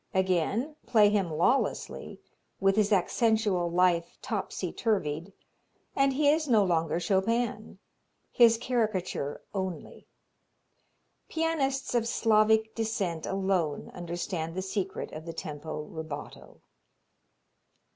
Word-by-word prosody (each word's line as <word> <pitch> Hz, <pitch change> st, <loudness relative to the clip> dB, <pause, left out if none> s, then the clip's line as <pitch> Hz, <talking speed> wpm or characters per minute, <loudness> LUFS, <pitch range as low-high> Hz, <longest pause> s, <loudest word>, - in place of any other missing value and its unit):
Again 190 Hz, -, +1 dB
play 215 Hz, -4 st, +5 dB
him 200 Hz, -4 st, +1 dB
lawlessly, 175 Hz, -, 0 dB, 0.4 s
with 195 Hz, 0 st, +3 dB
his 210 Hz, -1 st, +3 dB
accentual 205 Hz, -3 st, +2 dB
life 175 Hz, -1 st, +2 dB
topsy -, -, -3 dB
turvied, 175 Hz, -6 st, -1 dB, 0.6 s
and 275 Hz, 0 st, +3 dB
he 290 Hz, +2 st, +2 dB
is 310 Hz, +1 st, +3 dB
no 220 Hz, -5 st, +5 dB
longer 165 Hz, -3 st, +1 dB
Chopin 215 Hz, +4 st, 0 dB, 0.5 s
his 230 Hz, -2 st, +6 dB
caricature 215 Hz, -, -2 dB
only. 190 Hz, -4 st, -5 dB, 1.2 s
Pianists 285 Hz, -5 st, -1 dB
of 235 Hz, -1 st, +1 dB
Slavic 220 Hz, -1 st, +3 dB
descent 200 Hz, -8 st, -2 dB
alone 190 Hz, -6 st, -1 dB
understand 170 Hz, -1 st, -4 dB
the 185 Hz, -, -2 dB
secret 190 Hz, 0 st, -3 dB
of 155 Hz, +2 st, -8 dB
the 165 Hz, -, -5 dB
tempo 155 Hz, -2 st, -6 dB
rubato. 155 Hz, -1 st, -8 dB
195 Hz, 105 wpm, -29 LUFS, 170-225 Hz, 1.2 s, his